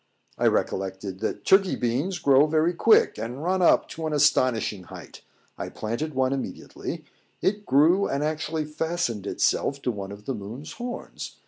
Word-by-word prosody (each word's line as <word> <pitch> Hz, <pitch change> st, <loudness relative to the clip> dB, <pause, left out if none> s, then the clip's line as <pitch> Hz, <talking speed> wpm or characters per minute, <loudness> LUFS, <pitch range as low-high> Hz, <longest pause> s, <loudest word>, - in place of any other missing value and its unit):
I -, -, +3 dB
recollected 95 Hz, 0 st, -1 dB
that -, -, -3 dB
Turkey 195 Hz, -1 st, +4 dB
beans 135 Hz, +11 st, -1 dB
grow 140 Hz, -2 st, +5 dB
very 160 Hz, +3 st, +2 dB
quick, 220 Hz, +6 st, +4 dB
and 125 Hz, +6 st, -5 dB
run 185 Hz, +2 st, +1 dB
up 175 Hz, -, +4 dB
to 160 Hz, -1 st, -4 dB
an 155 Hz, -, -2 dB
astonishing 130 Hz, -9 st, +2 dB
height. -, -, -11 dB, 0.4 s
I -, -, -4 dB
planted 120 Hz, +8 st, -4 dB
one 130 Hz, 0 st, +2 dB
immediately; 135 Hz, -, -6 dB, 0.3 s
it 205 Hz, +1 st, -1 dB
grew, 160 Hz, +9 st, +4 dB
and 140 Hz, +1 st, -1 dB
actually 155 Hz, 0 st, -2 dB
fastened 150 Hz, -, -2 dB
itself 140 Hz, +6 st, 0 dB
to 125 Hz, -, +1 dB
one 100 Hz, -3 st, -6 dB
of 100 Hz, +1 st, -11 dB
the 135 Hz, -, -2 dB
moon's 115 Hz, +7 st, -7 dB
horns. 245 Hz, +1 st, -7 dB
145 Hz, 160 wpm, -25 LUFS, 115-165 Hz, 0.4 s, grow